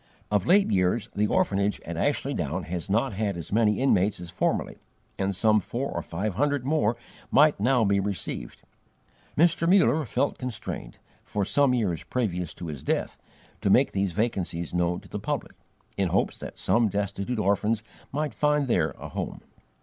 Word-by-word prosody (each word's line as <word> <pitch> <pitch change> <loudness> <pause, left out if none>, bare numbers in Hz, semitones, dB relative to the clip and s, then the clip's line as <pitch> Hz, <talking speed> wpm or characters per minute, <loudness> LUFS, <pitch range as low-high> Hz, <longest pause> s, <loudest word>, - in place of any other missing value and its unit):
Of 105 -2 +1
late 195 +2 +5
years 95 +4 +1
the 105 +1 +2
orphanage 100 0 +1
at - - -6
Ashley - - 0
Down 85 +7 -2
has 90 +1 -4
not 115 +4 +1
had 100 -2 -1
as 85 - -6
many 105 -1 +3
inmates 105 -7 +2
as 90 -1 -8
formerly, 85 - -1 0.4
and 95 0 0
some 110 +3 +4
four 120 +8 -3
or - - -2
five 95 +5 -3
hundred 140 +4 0
more 120 -6 +1 0.3
might 150 -1 +5
now 125 +2 +3
be 100 0 +3
received. 95 -10 -4 0.7
Mr. 165 +1 +3
MUller 180 -5 +4
felt 140 +7 0
constrained, 125 -4 -5 0.3
for 100 -1 -2
some 140 +3 +3
years 95 -10 -1
previous 90 -9 -2
to 85 - -7
his 75 -5 -6
death, - - -1 0.5
to - - +1
make - - +5
these 95 -2 -1
vacancies 90 -6 -2
known 90 0 0
to - - -16
the - - -5
public, - - -3 0.4
in - - +2
hopes - - 0
that - - -8
some 115 0 +3
destitute 100 +4 -2
orphans 105 +2 +1 0.3
might 150 +2 -2
find 150 -1 +2
there 120 - +1
a - - -8
home. - - -5
105 Hz, 175 wpm, -26 LUFS, 95-125 Hz, 0.7 s, late